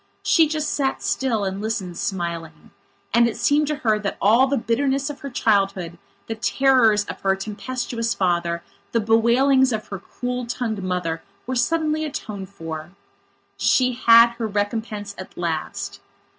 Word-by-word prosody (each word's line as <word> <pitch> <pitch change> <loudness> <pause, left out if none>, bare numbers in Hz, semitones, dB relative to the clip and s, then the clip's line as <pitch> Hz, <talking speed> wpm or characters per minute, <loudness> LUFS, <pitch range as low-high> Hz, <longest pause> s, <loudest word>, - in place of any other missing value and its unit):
She 325 -3 +4
just 305 0 -2
sat 270 -2 -1
still 230 -6 0
and 190 +1 -3
listened, 210 -5 -3
smiling. 170 -5 -4 0.4
And 235 +1 +5
it 230 - -4
seemed 295 +1 +2
to 300 - 0
her 215 -1 +3
that 200 -1 -3
all 230 +6 +5
the 280 +1 0
bitterness 270 +5 0
of 285 - -11
her 280 - -6
childhood, 195 -7 0 0.3
the 225 - -3
terrors 225 -2 +3
of - - -8
her 195 -1 +2
tempestuous 230 +3 -3
father, 170 -2 0 0.3
the 230 - +3
bewailings 240 +5 +4
of 215 -1 -3
her 195 - -5
cruel 250 +5 -5
tongued 230 -4 -3
mother 180 -3 -2 0.2
were 255 - -3
suddenly 310 +4 +1
atoned 210 -10 -5
for. 165 -2 -7 0.6
She 255 -1 +3
had 235 -1 +7
her 225 - -1
recompense 205 0 -3
at 185 - -10
last. 165 -3 -3
225 Hz, 155 wpm, -22 LUFS, 195-255 Hz, 0.6 s, had